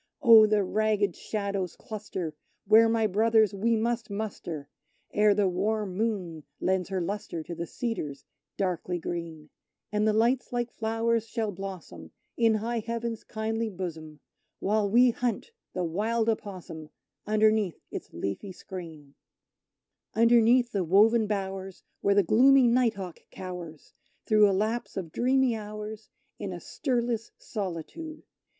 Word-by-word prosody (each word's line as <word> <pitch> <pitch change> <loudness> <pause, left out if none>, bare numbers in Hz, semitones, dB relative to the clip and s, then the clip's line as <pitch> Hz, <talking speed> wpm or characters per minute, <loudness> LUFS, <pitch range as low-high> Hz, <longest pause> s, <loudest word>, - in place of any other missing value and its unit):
Oh! 225 -3 +9
the 210 -1 +2
ragged 210 -1 +1
shadows 200 -4 -3
cluster 195 -7 -5 0.3
where, 220 +2 +6
my 225 -1 +2
brothers, 220 0 +3
we 225 +4 +1
must 230 0 -1
muster 200 -8 -5 0.5
Ere 210 -1 +4
the 205 -1 +3
warm 200 +1 -1
moon 185 -7 -2 0.2
lends 190 -1 0
her 190 -1 -1
lustre 175 -2 -4
to 170 - -7
the 170 0 -5
cedars 155 - -4 0.3
darkly 180 -2 -1
green; 165 -3 -6 0.4
And 210 +1 +1
the - - +4
lights 235 +4 +2
like 240 -1 -2
flowers 225 0 0
shall 220 -2 -2
blossom, 180 - -8 0.3
in 225 -2 +3
high 230 +2 -1
Heaven's 230 0 -4
kindly 220 +1 -2
bosom, 160 -6 -7 0.4
While 205 0 +1
we 245 +3 +6
hunt 245 - -2 0.2
the 180 - -1
wild 220 +7 0
opossum, 185 -8 -5 0.4
underneath 215 -4 +2
its - - -7
leafy 100 - -4
screen; 160 -7 -9 1.0
Underneath 235 +1 +5
the 195 -3 0
woven 215 +6 +4
bowers, 195 -2 -4 0.2
where 200 0 +3
the 200 - +5
gloomy 260 +7 +6
night 235 -2 +3
hawk 185 -4 -7
cowers, 180 -4 -8 0.3
Through 210 -2 +5
a - - +2
lapse 215 +5 -1
of 175 -4 -4
dreamy 255 +2 +2
hours, 215 0 -7 0.3
in 200 -2 -4
a 175 - -6
stirless 235 - -2
solitude! 210 - -6
210 Hz, 135 wpm, -28 LUFS, 185-225 Hz, 1.0 s, Oh